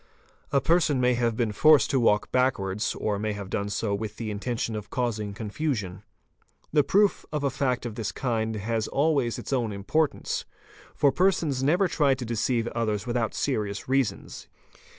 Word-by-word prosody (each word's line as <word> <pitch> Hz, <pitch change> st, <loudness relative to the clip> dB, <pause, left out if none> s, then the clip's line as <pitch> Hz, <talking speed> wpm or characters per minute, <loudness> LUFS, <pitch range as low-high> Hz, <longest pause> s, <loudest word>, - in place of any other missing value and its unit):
A 140 Hz, -, +4 dB
person 155 Hz, 0 st, +2 dB
may 125 Hz, 0 st, +3 dB
have 120 Hz, -2 st, 0 dB
been 115 Hz, -3 st, 0 dB
forced 155 Hz, +8 st, +5 dB
to 135 Hz, -, +2 dB
walk 105 Hz, -3 st, +2 dB
backwards, 105 Hz, -6 st, 0 dB
or 105 Hz, -2 st, -2 dB
may 105 Hz, 0 st, -1 dB
have 100 Hz, -2 st, -7 dB
done 100 Hz, 0 st, -1 dB
so 100 Hz, 0 st, -1 dB
with 105 Hz, +1 st, -4 dB
the 110 Hz, -1 st, -4 dB
intention 110 Hz, +2 st, -3 dB
of 105 Hz, -1 st, -6 dB
causing 110 Hz, -5 st, -2 dB
confusion. 105 Hz, -, -3 dB, 0.7 s
The 150 Hz, -2 st, +5 dB
proof 205 Hz, +5 st, +2 dB
of 150 Hz, -1 st, -2 dB
a 140 Hz, -, +1 dB
fact 130 Hz, -2 st, -1 dB
of 120 Hz, -, -4 dB
this 110 Hz, -2 st, -3 dB
kind 110 Hz, -3 st, -1 dB
has 110 Hz, +1 st, -2 dB
always 140 Hz, -5 st, +1 dB
its -, -, -5 dB
own 120 Hz, -4 st, 0 dB
importance, 130 Hz, +10 st, -1 dB, 0.5 s
for 140 Hz, -, +4 dB
persons 165 Hz, -6 st, +1 dB
never 175 Hz, +8 st, +3 dB
try 145 Hz, -5 st, +2 dB
to 125 Hz, -1 st, -6 dB
deceive 115 Hz, +1 st, 0 dB
others 110 Hz, -3 st, -2 dB
without 120 Hz, -2 st, -1 dB
serious 105 Hz, -7 st, -2 dB
reasons. 135 Hz, -2 st, -1 dB
120 Hz, 170 wpm, -26 LUFS, 105-140 Hz, 0.7 s, forced